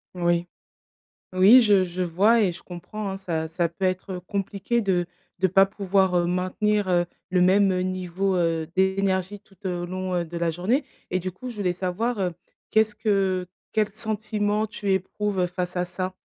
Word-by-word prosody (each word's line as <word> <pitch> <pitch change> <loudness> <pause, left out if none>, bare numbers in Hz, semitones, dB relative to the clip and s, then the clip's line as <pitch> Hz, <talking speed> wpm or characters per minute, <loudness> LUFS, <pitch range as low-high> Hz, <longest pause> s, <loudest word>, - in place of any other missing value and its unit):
Mmh 175 - -5
oui. 175 0 +2 0.9
Oui 205 +7 +7
je 200 -4 +4
je 180 +1 -4
vois 200 +7 +3
et 190 -5 +2
je 170 - -12
comprends, 190 +4 -6
hein. 190 - -4
Ça 165 -4 -3
ça 170 +1 0
peut 180 +3 -5
être, 185 +1 -1
heu, 180 - -5
compliqué 200 +5 -2
de 185 -4 +1 0.4
de 190 - +4
pas 195 +2 +5
pouvoir, 195 -2 +1
heu, 175 - +2
maintenir, 185 +3 0
heu, 175 -1 +2 0.2
le 185 - +2
même, 190 +2 +4
heu, 180 - 0
niveau, 185 +1 -1
heu, 165 -2 0
d'énergie 190 +1 +1
tout, 195 -1 -25
heu, 175 -1 -2
au - - -3
long, 185 +1 -3
heu, 175 -1 0
de 170 +1 -8
la 170 -1 0
journée, 225 - 0 0.3
et 185 - +1
du 185 0 -4
coup, 250 +8 -8
je 235 - -10
voulais 185 -3 0
savoir, 195 +5 -2
heu, 180 -2 0 0.4
qu'est-ce 220 -1 +3
que 195 -4 +1 0.3
quel 215 -1 +2
sentiment 215 -1 -1
tu 200 -2 -2
éprouves 190 0 -1
face 180 0 -4
à 180 - +1
ça? 185 +1 -4
185 Hz, 195 wpm, -25 LUFS, 180-205 Hz, 0.9 s, Oui